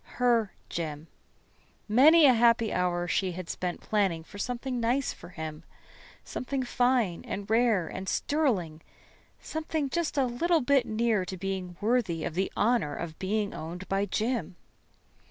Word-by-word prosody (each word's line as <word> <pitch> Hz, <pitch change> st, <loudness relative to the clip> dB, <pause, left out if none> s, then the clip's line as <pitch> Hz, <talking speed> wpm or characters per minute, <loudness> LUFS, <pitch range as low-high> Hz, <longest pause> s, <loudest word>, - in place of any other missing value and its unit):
Her 235 Hz, -4 st, +2 dB
Jim. 155 Hz, -2 st, -4 dB, 0.8 s
Many 295 Hz, +9 st, +7 dB
a 260 Hz, -, +7 dB
happy 230 Hz, -1 st, +3 dB
hour 175 Hz, -1 st, 0 dB
she 185 Hz, +1 st, 0 dB
had 180 Hz, 0 st, -7 dB
spent 180 Hz, -1 st, -4 dB
planning 195 Hz, -6 st, 0 dB
for 205 Hz, +5 st, -12 dB
something 250 Hz, +2 st, -3 dB
nice 245 Hz, +4 st, 0 dB
for -, -, -13 dB
him. 160 Hz, -3 st, -6 dB, 0.6 s
Something 265 Hz, +1 st, -3 dB
fine 245 Hz, -7 st, +1 dB
and 200 Hz, 0 st, -5 dB
rare 220 Hz, -6 st, +2 dB
and 190 Hz, +3 st, -5 dB
sterling 200 Hz, -, 0 dB, 0.6 s
something 310 Hz, -3 st, -3 dB
just 340 Hz, -3 st, -1 dB
a 270 Hz, -, +4 dB
little 320 Hz, +7 st, +1 dB
bit 270 Hz, -1 st, +3 dB
near 220 Hz, -2 st, +1 dB
to 185 Hz, +1 st, -6 dB
being 185 Hz, -2 st, -4 dB
worthy 210 Hz, -7 st, +1 dB
of -, -, -3 dB
the 190 Hz, +3 st, -1 dB
honor 215 Hz, -10 st, +2 dB
of 165 Hz, -2 st, -6 dB
being 205 Hz, +2 st, -1 dB
owned 175 Hz, +4 st, -7 dB
by 195 Hz, +1 st, +1 dB
Jim. 220 Hz, 0 st, -1 dB
215 Hz, 150 wpm, -28 LUFS, 180-250 Hz, 0.8 s, Many